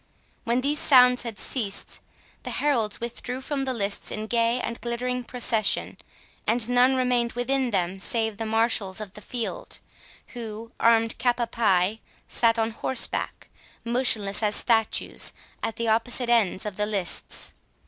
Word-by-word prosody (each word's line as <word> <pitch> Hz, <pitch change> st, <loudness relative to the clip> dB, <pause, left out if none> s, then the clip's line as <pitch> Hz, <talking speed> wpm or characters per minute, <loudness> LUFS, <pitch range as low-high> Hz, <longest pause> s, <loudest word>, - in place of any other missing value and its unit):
When 235 Hz, +2 st, +1 dB
these 290 Hz, +3 st, +2 dB
sounds 250 Hz, -2 st, +6 dB
had 230 Hz, -4 st, -6 dB
ceased, 205 Hz, -7 st, -3 dB, 0.4 s
the -, -, -6 dB
heralds 235 Hz, -8 st, 0 dB
withdrew 245 Hz, +2 st, -5 dB
from 270 Hz, 0 st, -3 dB
the 260 Hz, -, -1 dB
lists 200 Hz, -2 st, -2 dB
in 215 Hz, -, -3 dB
gay 230 Hz, +2 st, +1 dB
and 235 Hz, -1 st, -5 dB
glittering 250 Hz, +1 st, -2 dB
procession, 230 Hz, -4 st, -1 dB, 0.5 s
and 230 Hz, +1 st, +2 dB
none 245 Hz, +2 st, +4 dB
remained 250 Hz, -2 st, +1 dB
within 255 Hz, +1 st, 0 dB
them 190 Hz, -2 st, -1 dB
save 220 Hz, +1 st, -1 dB
the 225 Hz, 0 st, -3 dB
marshals 220 Hz, -3 st, +1 dB
of 205 Hz, -3 st, -7 dB
the 210 Hz, -, -10 dB
field, 245 Hz, -, -5 dB, 0.5 s
who, 225 Hz, -1 st, -7 dB
armed 230 Hz, -1 st, +3 dB
cap 245 Hz, -1 st, +1 dB
a 240 Hz, -, +1 dB
pie, 210 Hz, -2 st, +1 dB, 0.3 s
sat 230 Hz, -1 st, +2 dB
on 225 Hz, 0 st, 0 dB
horseback, 255 Hz, +3 st, -1 dB, 0.4 s
motionless 230 Hz, -5 st, +2 dB
as 210 Hz, -1 st, +2 dB
statues, 225 Hz, -2 st, +2 dB, 0.3 s
at 225 Hz, -, -3 dB
the 230 Hz, -, -2 dB
opposite 235 Hz, +2 st, +1 dB
ends 215 Hz, -5 st, +2 dB
of 210 Hz, -3 st, -5 dB
the 210 Hz, 0 st, 0 dB
lists. 195 Hz, -5 st, -1 dB
230 Hz, 150 wpm, -25 LUFS, 215-245 Hz, 0.5 s, sounds